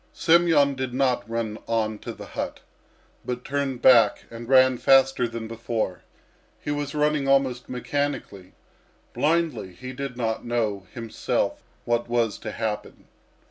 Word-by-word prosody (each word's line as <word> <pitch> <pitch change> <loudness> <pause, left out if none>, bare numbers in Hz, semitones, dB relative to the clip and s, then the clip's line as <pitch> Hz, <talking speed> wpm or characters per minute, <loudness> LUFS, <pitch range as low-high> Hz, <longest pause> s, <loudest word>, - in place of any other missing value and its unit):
Semyon 165 -4 +4
did 130 -2 -4
not 125 -5 +1
run 115 -2 -3
on 110 -2 -1
to - - -6
the - - -10
hut, - - -5 0.6
but 125 0 -5
turned 135 -3 -2
back 115 -5 +6
and 115 +1 -8
ran 130 -2 +5
faster 135 -2 +4
than 115 -1 -6
before. 115 -4 -3 0.6
He 145 - -4
was 145 0 -3
running 150 -2 +1
almost 135 -2 +2
mechanically, 125 -7 -3 0.6
blindly; 155 - 0
he 130 +8 -8
did 135 -1 -5
not 115 -2 -2
know 110 -5 -2
himself 115 -3 -2 0.2
what 120 0 0
was 120 -3 0
to - - -5
happen. 110 -2 -5
125 Hz, 140 wpm, -25 LUFS, 115-140 Hz, 0.6 s, back